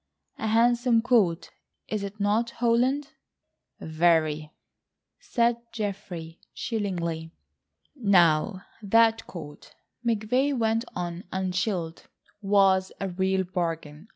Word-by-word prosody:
A 220 - -2
handsome 235 +1 +3
coat, 205 -9 +2 0.4
is 215 -1 -2
it 200 +1 -6
not, 210 +3 +1
Holland?" 245 +5 +1 0.7
"Very," 155 -2 +1 0.7
said 235 -1 +1
Geoffrey 190 -6 -5 0.2
chillingly. 170 -7 -3 0.6
"Now 185 - +3 0.2
that 225 +2 +3
coat," 150 -4 -10 0.3
McVay 240 +5 +1
went 225 +1 +1
on 175 0 -4
unchilled, 185 -2 -2 0.3
"was 195 -2 +3
a 195 - -2
real 190 +1 0
bargain. 165 -2 -4
195 Hz, 95 wpm, -26 LUFS, 170-230 Hz, 0.7 s, handsome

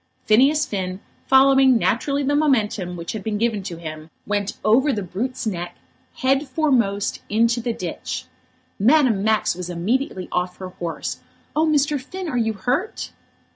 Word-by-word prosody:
Phineas 275 +7 +4
Finn, 185 -5 -4 0.3
following 270 -1 +6
naturally 280 +6 0
the 285 +1 +1
momentum 215 -11 +1
which 170 0 -5
had 215 -3 -5
been 215 0 -2
given 225 -2 0
to 180 -3 -6
him, 155 -1 -8 0.2
went 205 0 -2
over 255 +7 +4
the 205 -5 -2
brute's 235 +9 -4
neck 175 -5 -4 0.5
head 270 +2 +2
foremost 235 -11 +1
into 230 +3 +2
the 235 +1 -1
ditch. - - -5 0.5
Madame 245 -2 +4
Max 220 0 +2
was 180 0 -6
immediately 185 +3 -1
off 180 0 -1
her 185 -1 -7
horse. 170 -2 -5 0.4
"Oh, 315 +1 +3
Mr. 290 -2 +2
Finn, 370 +7 -7
are 300 - -3
you 225 -2 +1
hurt?" 250 - -2
225 Hz, 155 wpm, -22 LUFS, 190-270 Hz, 0.5 s, following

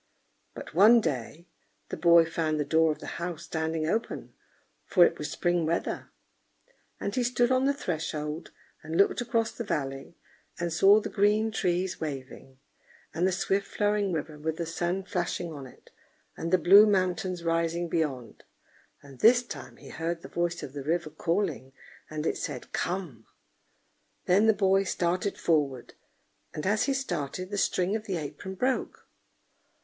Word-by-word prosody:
But - - -9
one 215 +8 +7
day 155 - -4 0.4
the - - -3
boy 170 -1 +6
found 160 -2 -1
the 150 - 0
door 160 +2 +3
of 150 - -4
the - - -10 0.2
house 170 -2 -4
standing 160 -1 -2
open, 220 +8 -3 0.5
for 180 -4 +5
it - - -1
was 150 - -4
spring 175 -1 0
weather; 165 +2 -2 0.9
and 200 - -3
he 255 - 0
stood 245 0 +1
on 260 +1 +3
the 280 - +3
threshold 155 - -4 0.3
and 160 +1 -4
looked 200 - +3
across 230 -1 0
the 235 - -6
valley, 135 -4 -4 0.4
and 170 -1 -2
saw 195 +5 +6
the - - -5
green 210 +2 +2
trees 185 -3 -1
waving, 135 -3 -7 0.6
and 175 +3 +1
the - - +1
swift 195 +2 0
flowing 205 -1 0
river 155 -2 -4
with 160 +1 -3
the 170 - -2
sun 175 +3 -2
flashing 175 -3 -3
on 140 -3 -8
it, - - -19 0.4
and 165 - -4
the 185 - +6
blue 195 +5 +7
mountains 185 -2 0
rising 165 +1 0
beyond; 150 -8 -3 0.6
and 135 -3 -14
this 240 +2 +6
time 245 - -9
he - - -13
heard 165 +2 -4
the - - -7
voice 175 0 -2
of 130 - -7
the 145 - -5
river 160 +2 -1
calling, 165 -4 -2 0.4
and 155 0 -4
it - - 0
said 135 -5 -6
"Come!" 170 - -3 1.0
Then 200 +5 +4
the 220 - +6
boy 195 -1 +3
started 180 +1 -1
forward, 145 -6 0 0.6
and 150 - -4
as 210 +2 +2
he 275 - +1
started, 185 - -3
the 205 - -2
string 185 +2 +1
of 220 0 -5
the 190 -3 -1
apron 155 +5 -6
broke. 255 +6 -2
175 Hz, 165 wpm, -28 LUFS, 155-200 Hz, 1.0 s, one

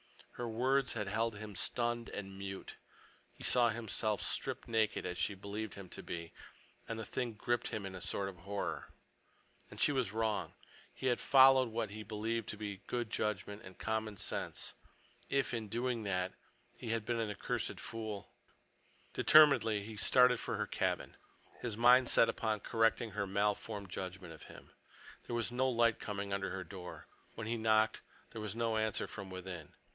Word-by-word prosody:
Her 120 - -4
words 130 +4 +2
had 105 -3 -2
held 110 +2 0
him 105 -1 -7
stunned 120 +2 -1
and 95 -1 -6
mute. 95 0 -6 0.6
He - - -13
saw 120 -2 +5
himself 110 -2 -1
stripped - - -2
naked, 110 -2 +1
as 90 -1 -3
she 105 - +1
believed 100 +2 -5
him 100 -2 -8
to - - -7
be, 85 -1 -6 0.5
and 115 - -3
the 115 - -4
thing 125 0 -2
gripped 120 +2 0
him 105 - -3
with 95 -1 -5
a 90 - -7
sort 100 0 -2
of 95 -2 -7
horror. 100 +4 -3 0.8
And - - -11
she - - +4
was 130 -8 0
wrong. 110 -1 -1 0.4
He - - -8
had 125 -2 +3
followed 130 -2 +7
what 110 -2 -2
he 110 +1 -6
believed 110 +2 -2
to 105 - -4
be 100 -2 -5
good 120 -3 -2
judgment 105 0 -2
and 95 -1 -11
common 110 -2 -2
sense. - - -3 0.6
If, 140 -2 +1
in 115 -2 -2
doing 120 +2 -1
that, 90 -1 0 0.4
he - - -7
had 115 -1 0
been 120 0 0
an 110 -2 0
accursed 105 - -2
fool— 110 -3 -5 0.8
Determinedly 130 -9 +6
he 110 +1 -7
started 125 +3 +5
for - - -3
her - - 0
cabin, - - -1 0.4
his 115 -4 -3
mind 125 +2 +7
set 115 - +6
upon 110 -2 -1
correcting 115 0 +2
her 100 - -2
malformed 100 0 -1
judgment 90 -2 -5
of 80 - -12
him. - - -13 0.6
There 120 - -2
was 115 0 -1
no 130 +2 +2
light 115 -2 +3
coming 100 -1 -3
under 100 0 -1
her 95 0 -4
door. 90 0 -9 0.3
When 115 - -5
he 115 +2 -1
knocked, 110 0 +3 0.3
there 110 - -6
was 105 -1 -4
no 115 -1 +1
answer 110 0 0
from 100 -3 -7
within. 90 -4 -7
110 Hz, 180 wpm, -35 LUFS, 100-115 Hz, 0.8 s, followed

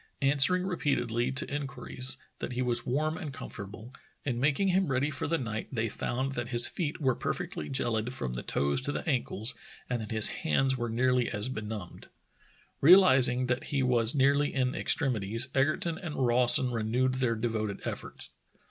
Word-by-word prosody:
Answering 145 +7 +3
repeatedly, 125 -9 -1
to 135 +2 0
inquiries, 135 -2 -2 0.2
that - - -5
he 125 +1 -1
was 120 -1 0
warm 155 +6 -1
and 155 -5 -6
comfortable, 110 -1 -9 0.3
in 125 -4 -2
making 150 +8 +1
him 185 0 +1
ready 135 +2 0
for 140 - -3
the 165 +2 0
night 115 -5 -5
they 115 -3 -2
found 130 +5 -3
that 120 -2 -4
his 120 -1 +6
feet 155 -5 -4
were 130 -4 +1
perfectly 75 - -5
geHd 120 -3 -1
from 65 - -4
the - - -4
toes 70 - 0
to 145 - -2
the - - -5
ankles 125 -5 0 0.3
and 125 -2 -2
that 110 - -7
his 110 -1 +4
hands 130 - +1
were 120 -2 -3
nearly 125 +1 +1
as 105 +2 -1
benumbed. 105 -6 -7 0.7
Realizing 130 -7 +6
that 125 0 -2
he 140 -2 -1
was 120 0 +4
nearly 140 +1 +2
in 130 -2 -1
extremities, 115 -3 0
Eger 140 +3 +2
ton 170 0 -4
and 175 -6 -6
Rawson 125 0 +3
renewed 120 +3 0
their 115 -3 +1
devoted 110 -2 -3
efforts. - - -7
125 Hz, 175 wpm, -29 LUFS, 115-140 Hz, 0.7 s, his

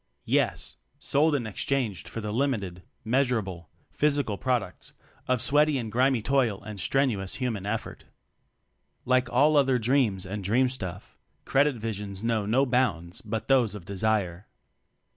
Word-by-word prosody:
Yes! - - 0 0.2
Sold 145 +2 +2
and 120 -6 -2
exchanged 110 - -2
for 115 - -5
the 105 -1 -4
limited, 110 -9 -1 0.2
measurable, 110 - 0 0.2
physical 145 -7 +1
prod 125 +3 0
ucts 90 - -12 0.3
of 130 -1 +2
sweaty 150 +2 +4
and 115 -4 -4
grimy 125 -1 +2
toil 125 -7 +1
and 105 -1 -8
strenuous 105 -3 0
human 115 -7 -3
effort. 110 +2 -4 1.0
Like 130 0 +2
all 145 +5 +4
other 135 -3 +4
dreams 115 -6 +1
and 100 +2 -5
dream 125 +7 +2
stuff. 95 -9 -7 0.3
''Credit" 140 0 +3
visions 105 -3 -5
know 115 -3 0
no 130 +6 +3
bounds 115 - 0
but 110 0 -4
those 125 -6 +3
of 95 -5 -9
desire. 100 -2 -1
115 Hz, 140 wpm, -27 LUFS, 100-130 Hz, 1.0 s, sweaty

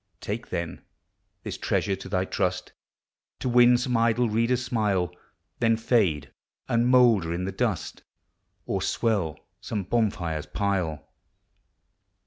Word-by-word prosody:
Take, - - -5
then, 85 -1 -4 0.6
this - - -5
treasure 100 - 0
to 95 - -9
thy 95 -1 0
trust, 95 -1 -2 0.7
To - - -4
win 120 0 +6
some 125 0 -1
idle 115 0 +2
reader's 120 +3 +1
smile, 100 -7 0 0.5
Then 115 -1 +3
fade 95 - +1 0.4
and 120 +1 +2
moulder 120 -9 +5
in 90 +2 -2
the 95 - -2
dust, 110 -7 -2 0.6
Or - - -2
swell 100 -10 0 0.2
some 105 -3 -3
bonfire's 90 -8 -1
pile. 90 -5 -2
105 Hz, 120 wpm, -26 LUFS, 90-120 Hz, 0.7 s, win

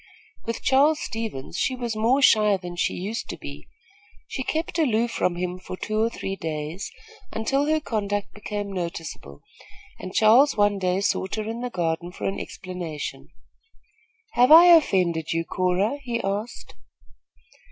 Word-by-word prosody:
With 230 - -4
Charles 290 +3 +4
Stevens, 220 -12 -5
she 260 - 0
was 240 -3 -3
more 240 +6 +2
shy 210 -4 +5
than 175 -1 -8
she 175 - 0
used 205 +6 -4
to - - -5
be. - - -9 0.6
She 265 - -4
kept 330 +6 -2
aloof 235 -6 +2
from 180 -5 0
him 180 +1 -3
for 185 0 -8
two 215 +2 -1
or 225 - +2
three 195 -4 -5
days, 160 +2 -5 0.4
until 275 +6 0
her 310 0 +2
conduct 205 -7 -3
became 205 -1 -5
noticeable, 165 - -6 0.6
and 185 - -7
Charles 235 +8 +5
one 205 -1 +3
day 185 +1 0
sought 190 -1 0
her 215 -1 -4
in 230 +2 -4
the 250 - -3
garden 175 -3 -2
for - - -10
an 195 - -2
explanation. 175 -5 -6 1.0
"Have 250 +4 +4
I 340 +2 +10
offended 175 - +1
you, 165 0 -1
Cora?" 185 +11 0
he 240 -3 -3
asked. 205 +4 -4
205 Hz, 155 wpm, -24 LUFS, 180-240 Hz, 1.0 s, I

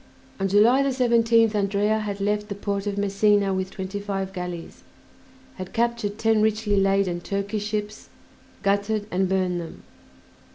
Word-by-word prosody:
On 195 - +1
July 215 +7 +5
17th 235 -4 +3
Andrea 205 +1 +1
had 205 -2 -4
left 210 +1 -1
the 200 - -4
port 200 0 -3
of 200 -1 -2
Messina 200 0 +2
with 190 0 -2
twenty 190 +1 -5
five 195 -2 -4
galleys, 180 -2 -6 0.8
had 185 -1 -7
captured 235 -3 -1
ten 225 -1 +2
richly 215 -1 +1
laden 195 -3 +1
Turkish 200 +2 -3
ships, 210 0 -4 0.5
gutted 205 +1 0
and 185 +1 +1
burned 185 -2 0
them. 165 - -10
205 Hz, 140 wpm, -24 LUFS, 195-215 Hz, 0.8 s, July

